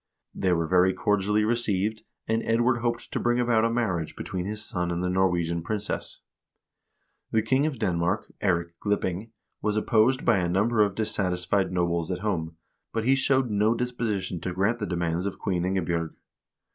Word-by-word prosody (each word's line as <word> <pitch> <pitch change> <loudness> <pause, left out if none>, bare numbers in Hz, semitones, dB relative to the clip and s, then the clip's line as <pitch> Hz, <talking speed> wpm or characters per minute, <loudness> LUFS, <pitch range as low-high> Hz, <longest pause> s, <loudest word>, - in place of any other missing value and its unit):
They 95 - 0
were 85 -1 +1
very 90 +2 +3
cordially 105 +2 +1
received, 110 -2 0 0.3
and 110 +1 +1
Edward 120 +2 +2
hoped 120 0 -2
to - - -1
bring 120 0 +1
about 120 -2 +3
a 115 - +3
marriage 110 -9 -1
between 90 -1 -4
his 105 +2 -3
son 90 -6 -2
and 85 +1 -2
the 90 - 0
Norwegian 85 -3 +1
princess. 105 +4 -4 1.1
The 110 -1 +1
king 130 +6 +2
of 145 -4 -3
Denmark, 90 -1 -1
Eirik 85 -3 +1
dipping, 100 +1 -1 0.3
was 105 0 0
opposed 115 +4 +2
by 95 - +4
a 90 -1 0
number 105 +5 +2
of 100 -2 +2
dissatisfied 95 -3 0
nobles 85 -2 0
at 90 -1 -3
home, 80 -6 -2 0.4
but 115 - -1
he 130 +4 +4
showed 135 -2 +2
no 105 +3 +2
disposition 115 -7 -2
to 90 - -3
grant 105 +6 +1
the 105 - -2
demands 85 +1 -1
of 100 - -5
Queen 90 -3 -1
IngebJ0rg. 85 -3 -1
100 Hz, 170 wpm, -26 LUFS, 90-115 Hz, 1.1 s, by